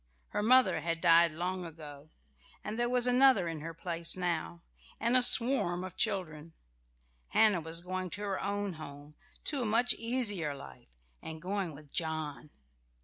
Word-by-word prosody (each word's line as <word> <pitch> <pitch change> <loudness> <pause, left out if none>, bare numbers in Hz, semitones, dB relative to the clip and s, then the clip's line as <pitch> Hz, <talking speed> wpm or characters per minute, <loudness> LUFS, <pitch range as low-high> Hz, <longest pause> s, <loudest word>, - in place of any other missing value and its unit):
Her - - -2
mother 255 +4 +4
had 165 0 -3
died 165 0 +5
long 180 +3 -4
ago, 155 -3 -11 0.5
and 215 +2 -5
there 240 0 +1
was 250 -1 +2
another 250 -6 +4
in 165 -2 -5
her 165 +2 -6
place 170 +1 -1
now, 170 -1 -3 0.4
and 235 +2 0
a 255 - +6
swarm 235 -8 +4
of 185 -1 -8
children. 165 -7 -2 0.7
Hannah 210 -6 +3
was 160 +1 -3
going 185 +1 -5
to - - -9
her 200 -2 -3
own 200 -1 -3
home, 145 -1 -11 0.3
to 285 -4 -2
a - - -2
much 230 +3 +3
easier 205 - 0
life, 65 - -13 0.3
and 160 0 -8
going 185 -2 -4
with 145 -1 -15
John. 155 -2 -3
180 Hz, 160 wpm, -31 LUFS, 160-215 Hz, 0.7 s, a